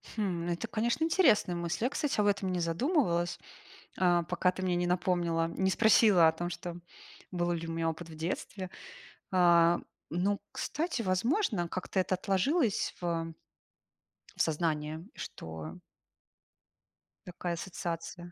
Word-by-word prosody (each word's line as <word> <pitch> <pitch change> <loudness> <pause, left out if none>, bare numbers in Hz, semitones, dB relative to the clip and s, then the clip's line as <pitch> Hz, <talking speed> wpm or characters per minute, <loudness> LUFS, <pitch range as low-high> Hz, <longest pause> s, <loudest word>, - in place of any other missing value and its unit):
Хм, 180 -6 -1
это, 175 +6 -2
конечно, 235 +7 0
интересная 310 - +3
мысль. 170 +4 -2
Я, - - +2
кстати, 290 -4 -1
об 205 - +3
этом 195 -2 +1
не 180 - -1
задумывалась, 175 - +1 0.6
э, 175 -2 +4
пока 180 - +2
ты 185 - -6
мне 180 -1 +1
не 175 0 0
напомнила, 175 -2 +1
не 190 +3 0
спросила 205 -5 +6
о - - +3
том, 175 +2 -4
что 175 0 -6 0.5
был 175 -1 0
ли 165 -1 -3
у 165 - -4
меня 165 0 0
опыт 165 +1 -7
в 160 - -10
детстве. 180 +3 -4 0.6
А, 175 -2 +5 0.3
но, 195 +5 0
кстати, 315 -4 -2
возможно, 205 - +1
как-то 185 +2 -3
это 185 0 +1
отложилось 200 - +1
в 165 -2 -2 1.0
в - - +1
сознании, 155 -1 -1
что 80 -1 -7 1.5
такая 175 -1 -3
ассоциация. 175 0 -5
175 Hz, 140 wpm, -31 LUFS, 170-200 Hz, 1.5 s, спросила